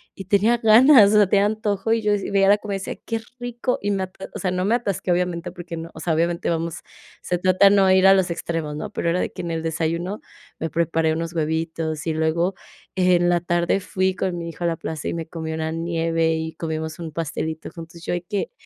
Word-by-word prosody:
y 195 - -8
tenía 210 +5 +3
ganas, 225 -1 +7
o - - +5
sea, 205 -2 +6
tenía 200 0 +4
antojo, 215 0 -1
y 230 - +1
yo 210 -1 +1
decía, 200 -1 -2
veía 195 0 +4
la 205 - +6
comida, 205 -2 -4
decía: 195 - -5
"Qué 225 -1 -2 0.2
rico", 245 +1 -2
y 205 - -1
me 195 -1 0
atas 190 +1 -8
o - - -4
sea, 185 - -1
no 185 0 -1
me 220 +4 +3
atasque, 200 -6 -2
obviamente, 175 0 -2
porque 175 -2 -7
no, 165 +1 -7
o - - -8
sea, 165 - 0
obviamente 170 +2 0
vamos, 165 -1 -2 0.4
se 180 - -1
trata 185 +2 +5
no 195 -2 +4
ir 190 0 +5
a 195 - +8
los 190 -1 +1
extremos, 165 -3 -3
¿no?, 205 +7 -5
pero, 170 - -1
era 180 - 0
de - - -2
que 180 - -6
en 170 - -3
el 165 -1 -3
desayuno, 165 +4 -2 0.4
me 160 - -2
preparé 165 -1 +1
unos 165 +1 -3
huevitos, 160 -1 -2
y 160 - +1
luego 160 +4 +1 0.4
en 180 -1 +3
la 175 0 +3
tarde 175 +2 +1
fui 190 0 0
con 185 -2 -2
mi 170 0 -5
hijo 170 +1 -5
a - - +3
la 165 - 0
plaza, 160 -1 -5
y - - -1
me 165 -1 -4
comí 160 -1 -5
una 160 0 -2
nieve 165 0 0
y 160 0 -3
comimos 160 0 -4
un 165 -2 -6
pastelito 160 0 -4
juntos, 165 0 -11
yo - - -2
ahí 175 - -1
que, 200 +2 -3
175 Hz, 240 wpm, -22 LUFS, 165-195 Hz, 0.4 s, a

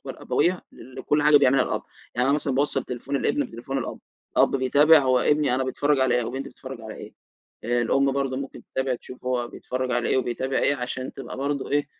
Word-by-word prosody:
الأبوية 180 +1 0
لكل 145 +3 -2
حاجة 150 0 +6
بيعملها 135 -1 +5
الأب، - - -2 0.3
يعني 125 +1 +1
أنا 140 - +4
مثلًا 145 -2 -1
باوصّل 135 -1 +1
تليفون 130 +3 -4
الابن 285 - 0
بتليفون 135 +4 -5
الأب، 125 - -5 0.4
الأب - - +4
بيتابع 145 +5 +5
هو 130 -3 +3
ابني 145 0 +2
أنا 130 +1 0
بيتفرّج 145 +2 +1
على 130 -2 +3
إيه، 125 - +2
أو 115 - -4
بنتي 135 +2 -5
بتتفرّج 130 -3 -9
على 110 -1 -8
إيه، - - -10 0.5
الأم 120 +4 +2
برضه 135 -1 -1
ممكن 135 0 -6
تتابع، 130 -1 0
تشوف 125 +1 -12
هو 125 -1 -1
بيتفرّج 130 +1 -4
على 120 -1 0
إيه - - +2
وبيتابع 130 +1 -1
إيه، 140 - +2
عشان 130 0 -4
تبقى 135 - -8
برضه 140 +1 -2
إيه، 145 0 +1
130 Hz, 205 wpm, -25 LUFS, 125-140 Hz, 0.5 s, حاجة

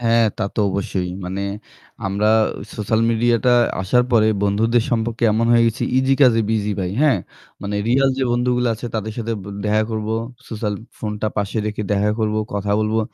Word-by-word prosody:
হ্যাঁ, 115 -1 +3
তা 110 - -3
তো - - 0
অবশ্যই। 95 -2 -2
মানে 95 +2 -3 0.6
আমরা 100 +2 +1 0.5
সোশ্যাল 110 +1 0
মিডিয়াটা 115 +1 +2 0.3
আসার 125 +6 +2
পরে 110 -2 +5
বন্ধুদের 110 +3 +2
সম্পর্কে 115 0 -1
এমন 115 +2 +1
হয়ে 115 0 +5
গেছি 115 +1 -1 0.2
ইসি 130 +1 +3
কাজে 120 -4 +5
বিজি 105 -2 0
ভাই। 90 -1 -2
হ্যাঁ 145 -9 +4 0.4
মানে 100 +1 -3
রিয়াল 135 +2 +4
যে - - 0
বন্ধুগুলা 125 0 +1
আছে 120 +3 -7
তাদের 110 0 -3
সাথে 115 0 -2 0.3
দেখা 105 +1 +2
করবো। 110 0 -2 0.3
সোশ্যাল 105 -2 -3 0.2
ফোনটা 105 0 -3
পাশে 100 +1 -2
রেখে 105 0 -3
দেখা 105 +1 +2
করবো, 110 -1 0 0.2
কথা 100 0 -1
বলবো। 110 +1 +1
110 Hz, 170 wpm, -20 LUFS, 105-115 Hz, 0.6 s, পরে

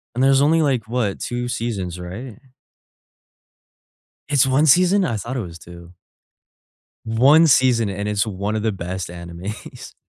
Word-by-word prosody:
And 125 - 0
there's 135 +1 +4
only 160 +2 +3
like, 130 -5 0
what, 115 -5 -1
2 120 0 -4
seasons, 100 -8 -4
right? 100 +6 -8 1.9
It's 140 -2 +3
1 135 +4 +2
season?! 185 +5 +4
I 120 - -1
thought 120 +5 -5
it 125 - -1
was 85 -4 -8
2. 85 +1 -14 1.1
1 135 +9 +5
season 120 -6 +3
and 100 +2 -4
it's 105 +1 0
one 100 +1 -3
of 105 - -2
the 110 - 0
best 95 -1 -5
animes. 85 +4 -9
115 Hz, 150 wpm, -21 LUFS, 95-130 Hz, 1.9 s, 1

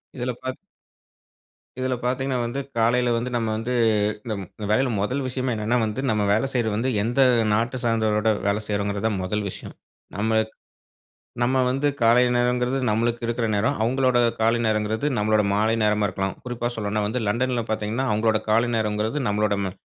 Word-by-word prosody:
இதுல 125 0 -2
பார்த் 130 0 -4 1.2
இதுல 130 0 -1
பார்த்தீங்கனா 130 +1 0
வந்து, 120 +4 -3 0.2
காலையில 120 +2 +2
வந்து 120 +2 -2
நம்ம 115 -2 0
வந்து 115 +3 -3 0.6
நம் 100 -3 -3 0.3
வேலையில 125 +4 +2
முதல் 125 +7 -1
விஷயமே 130 0 -2
என்னன்னா 110 +3 0
வந்து, 110 +4 -3
நம்ம 105 -1 +1
வேல 110 +5 +1
செய்றது 115 -4 0
வந்து 120 +5 0
எந்த 120 +5 +1 0.3
நாட்ட 120 +4 0
சார்ந்தவரோட 110 -2 +1 0.2
வேல 100 +1 +1
செய்றோங்கறது 100 0 -2
தான் 105 -4 -1
முதல் 105 +3 -2
விஷயம். - - -9 0.4
நம்ம 110 +2 +1 1.0
நம்ம 130 +2 +2
வந்து 135 +3 0
காலை 120 +1 +5
நேரங்கறது 125 +1 +1
நம்மளுக்கு 115 +2 0
இருக்கிற 115 0 -1
நேரம். 100 +2 0
அவங்களோட 130 +1 +2 0.2
கால 115 +1 +3
நேரங்கறது 110 +4 0
நம்முடைய 105 0 +2
மாலை 110 +2 +2
நேரமா 105 0 +2
இருக்கலாம். 95 0 -3
குறிப்பா 120 -1 -4
சொல்லணும்னா 105 -1 -2
வந்து 120 +4 -2
லண்டன்ல 120 +2 0
பார்த்தீங்கனா 110 +4 -1
அவங்களோட 110 +1 +2
காலை 115 +3 +3
நேரங்கறது 110 +5 -1
நம்மளோட 105 0 +1
ம 95 - -3
115 Hz, 155 wpm, -24 LUFS, 105-125 Hz, 1.2 s, காலை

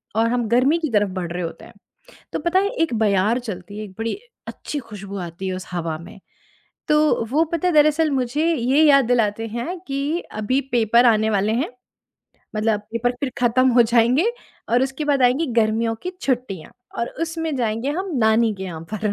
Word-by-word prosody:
और 225 +1 +3
हम 240 -2 0
गर्मी 260 +7 +3
की 315 -3 -2
तरफ़ 205 -2 +2
बढ़ 170 -1 -5
रहे 180 0 -3
होते 165 - -7
हैं, - - -15 0.6
तो - - -1
पता 345 +4 +2
है 400 +1 +1
एक 285 - -2
बयार 210 +3 +2
चलती 205 -3 -7
है, - - -4
एक 195 - -12
बड़ी 225 0 -1 0.3
अच्छी 295 - -5
खुशबू 200 -4 -8
आती 180 +3 -7
है 185 - -2
उस 185 - -8
हवा 165 -3 -3
में। 180 +4 -12 0.7
तो 300 - +4 0.3
वो 305 +4 +3
पता 335 +2 +1
है, - - +1
दरअसल 305 +1 +4
मुझे 270 +3 0
ये 265 +4 +2
याद 275 -3 +6
दिलाते 225 -2 +1
हैं 240 - -4
कि 280 +5 -1 0.2
अभी 255 +6 +1
पेपर 235 +1 +4
आने 220 -1 +3
वाले 205 +1 +1
हैं, 250 +6 0 0.9
मतलब 215 -1 +1
पेपर 245 +2 0
फिर 275 -2 -1
खत्म 250 +2 +3
हो 240 0 +6
जाएँगे 250 - +3 0.4
और 245 +2 +3
उसके 270 +3 -2
बाद 280 -3 +2
आएँगी 260 +6 +3
गर्मियों 225 +1 +1
की 365 - -3
छुट्टियाँ 240 - -2 0.3
और 235 - -1
उसमें 325 -2 -2
जाएँगे 230 +3 -1
हम 385 -1 -5
नानी 220 0 +3
के 190 - -8
यहाँ 165 -4 -6
पर। 210 0 -1
235 Hz, 195 wpm, -22 LUFS, 215-280 Hz, 0.9 s, याद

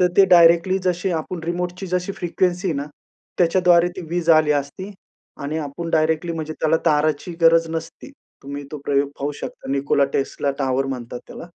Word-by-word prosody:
तर 180 - +5
ते 195 - +8
डायरेक्टली 170 +1 +5
जशी 180 +1 0
आपण 175 +1 -7
रिमोटची 180 +2 -3
जशी 180 +2 -2
फ्रिक्वेन्सी 180 +1 -1
आहे 160 - -1
ना, 140 - -2 0.5
त्याच्याद्वारे 175 0 +4
ती - - -5
वीज 170 -1 +1
आली 150 -1 +2
असती 145 +8 -3 0.5
आणि 150 +3 -3
आपण 160 +3 -5
डायरेक्टली 160 +2 +1
म्हणजे 155 -1 -4
त्याला 160 +1 +3
ताराची 150 +2 +1
गरज 165 0 +5
नसती. 165 +10 -6 0.3
तुम्ही 140 +1 -7
तो 150 - -5
प्रयोग 140 0 +1
पाहू 145 +1 -2
शकता. 140 - -8
Nikola 140 0 +2
Tesla 140 0 -1
Tower 135 0 0
म्हणतात 125 -2 -6
त्याला. - - -9
165 Hz, 170 wpm, -21 LUFS, 145-175 Hz, 0.5 s, ते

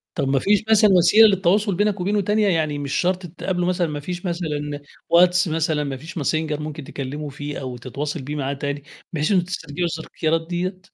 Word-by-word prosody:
طَب 140 -5 -1
ما 135 0 +2
فيش 205 +9 +2
مثلًا 215 -1 +6
وسيلة 190 +5 +7
للتواصل 195 +1 +2
بينك 205 +1 +1
وبينه 205 +3 +1
تانية، 210 +2 +2
يعني 155 -5 0
مش 140 -1 -4
شرط 180 +1 +1
تتقابلوا 180 +1 -3
مثلًا 180 -2 +1
ما 150 -1 -4
فيش 175 +5 -6
مثلًا 150 -4 -3 0.3
واتس 180 +1 +5
مثلًا، 160 -1 0
ما 140 -2 -4
فيش 160 +8 -10
ماسنجرممكن 155 0 -2
تكلّمه 145 +1 -5
فيه 145 +1 -6
أو 130 -2 -5
تتواصل 145 +5 -4
بيه 145 +3 -5
معاه 140 -1 -2
تاني 140 0 -4 0.3
بحيث 155 +4 0
إنّكم 180 -3 +3
تسترجعوا 175 -1 -3
التذكيرات 160 0 -2
دِيّة؟ 180 +2 -3
165 Hz, 185 wpm, -22 LUFS, 145-185 Hz, 0.3 s, وسيلة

